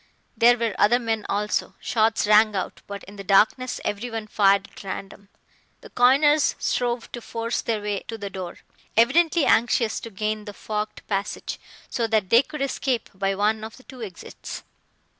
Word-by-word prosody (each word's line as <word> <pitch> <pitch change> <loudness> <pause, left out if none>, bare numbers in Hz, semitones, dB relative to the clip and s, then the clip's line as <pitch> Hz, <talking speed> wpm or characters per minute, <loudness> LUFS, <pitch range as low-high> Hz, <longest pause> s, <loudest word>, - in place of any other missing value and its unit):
There 240 +1 +5
were 230 -3 -1
other 225 +4 +5
men 225 -3 -2
also. 210 +1 -1
Shots 225 -1 +1
rang 215 0 +5
out, 190 - -4
but 200 -1 -7
in 200 +2 -12
the 195 - -7
darkness 215 +6 +3
everyone 220 +1 -3
fired 200 -2 +3
at - - -12
random. 195 +1 -7 0.5
The - - -13
coiners 285 +4 +4
strove 240 -1 -1
to 240 - -6
force 230 +1 -3
their 220 -3 -2
way 205 -1 -1
to 225 - -5
the 200 -2 -6
door, 185 -2 -6 0.4
evidently 320 +7 +4
anxious 230 -1 +2
to 230 - -8
gain 215 +1 -3
the 205 - -7
forked 210 0 -4
passage, 200 0 -3 0.3
so 230 -2 -1
that 215 -4 0
they 235 - +8
could 300 0 -5
escape 260 -3 -2
by 195 0 -1
one 215 +2 +1
of 220 0 -8
the 260 - -17
two 255 -2 -12
exits. 195 -6 -8
220 Hz, 175 wpm, -24 LUFS, 205-240 Hz, 0.5 s, they